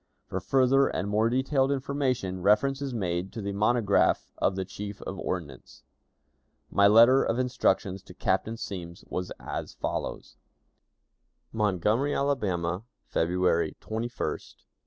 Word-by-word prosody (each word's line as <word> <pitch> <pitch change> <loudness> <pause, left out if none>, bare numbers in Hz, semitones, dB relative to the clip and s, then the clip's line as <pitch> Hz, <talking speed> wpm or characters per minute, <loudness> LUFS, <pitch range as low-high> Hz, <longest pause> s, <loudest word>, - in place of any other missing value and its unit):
For 95 - -3
further 135 +6 +3
and 95 - -2
more 110 +2 +2
detailed 135 +2 +1
information, 130 -9 -1
reference 135 +8 +3
is 140 -1 -3
made 90 -5 -2
to - - -5
the 100 - -2
monograph 105 0 +2
of 95 - +2
the 95 0 -2
Chief 100 +1 -7
of 95 - -6
Ordnance. 75 -9 -6 0.9
My 100 0 +5
letter 115 +5 +7
of 115 - 0
instructions 110 -7 0
to - - -13
Captain 115 +1 0
Semmes 90 -7 -7
was 90 0 -3
as - - -5
follows: - - -4 1.2
"Montgomery, 105 +6 +1
Alabama, 95 -11 0 0.2
February 90 0 +1
21, 110 +1 -4
1861. 120 0 -5
105 Hz, 130 wpm, -28 LUFS, 95-130 Hz, 1.2 s, letter